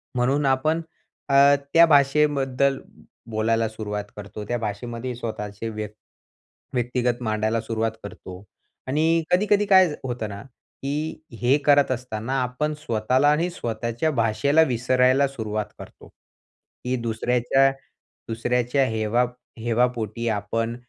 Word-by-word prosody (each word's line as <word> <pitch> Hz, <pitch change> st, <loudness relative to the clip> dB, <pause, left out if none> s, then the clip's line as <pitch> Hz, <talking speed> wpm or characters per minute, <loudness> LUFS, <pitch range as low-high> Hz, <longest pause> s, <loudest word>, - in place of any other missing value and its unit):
म्हणून 135 Hz, +4 st, +1 dB
आपण 140 Hz, +5 st, +1 dB, 0.5 s
अ, 140 Hz, +1 st, +6 dB, 0.2 s
त्या 170 Hz, +1 st, +8 dB
भाषेबद्दल 140 Hz, -2 st, +3 dB, 0.5 s
बोलायला 115 Hz, +1 st, +1 dB
सुरुवात 105 Hz, -2 st, -4 dB
करतो. 105 Hz, +1 st, -7 dB
त्या 120 Hz, -, -1 dB
भाषेमध्ये 115 Hz, +3 st, -4 dB
स्वतःचे 110 Hz, -2 st, -5 dB
व्य 110 Hz, -1 st, -4 dB, 0.9 s
व्यक्तिगत 125 Hz, 0 st, -1 dB
मांडायला 110 Hz, 0 st, 0 dB
सुरुवात 115 Hz, 0 st, -1 dB
करतो 95 Hz, -2 st, -9 dB, 0.4 s
आणि 160 Hz, +4 st, +2 dB
कधी-कधी 205 Hz, +3 st, +3 dB
काय 190 Hz, -2 st, +6 dB, 0.2 s
होतं 120 Hz, -4 st, -4 dB
ना, 100 Hz, 0 st, -7 dB
की 145 Hz, +4 st, -6 dB, 0.2 s
हे 125 Hz, +3 st, +4 dB
करत 145 Hz, -2 st, +5 dB
असताना 125 Hz, -1 st, -4 dB
आपण 140 Hz, +5 st, -2 dB
स्वतःला 130 Hz, +2 st, +1 dB
आणि 165 Hz, +4 st, +1 dB
स्वतःच्या 120 Hz, +2 st, -2 dB
भाषेला 120 Hz, +6 st, +2 dB
विसरायला 130 Hz, +3 st, +3 dB
सुरुवात 110 Hz, -5 st, -3 dB
करतो -, -, -12 dB
की 125 Hz, +1 st, -9 dB
दुसऱ्याच्या, 125 Hz, +3 st, +2 dB, 0.6 s
दुसऱ्याच्या 125 Hz, +4 st, +1 dB
हेवा 110 Hz, +2 st, +1 dB, 0.3 s
हेवापोटी 115 Hz, -1 st, -1 dB
आपण 115 Hz, +3 st, -2 dB
125 Hz, 110 wpm, -24 LUFS, 110-140 Hz, 0.9 s, त्या